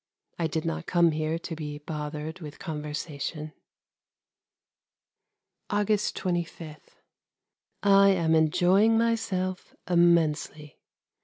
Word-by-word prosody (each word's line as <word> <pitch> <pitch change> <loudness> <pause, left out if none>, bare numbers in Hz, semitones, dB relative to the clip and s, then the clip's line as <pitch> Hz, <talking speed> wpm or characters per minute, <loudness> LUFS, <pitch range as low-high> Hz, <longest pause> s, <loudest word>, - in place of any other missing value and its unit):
I 165 - +1
did 160 0 -3
not 165 - -3
come 170 -2 +4
here 155 +1 -1
to 165 0 -6
be 150 -2 -6
bothered 150 +2 -6
with 150 -3 -9
conversation. 150 -1 -5 2.2
August 210 0 0
25. 170 -3 -4 1.1
I 200 0 +6
am 170 -4 +2
enjoying 180 +8 +4
myself 205 -5 -1
immensely. 160 -4 +1
165 Hz, 90 wpm, -27 LUFS, 155-185 Hz, 2.2 s, I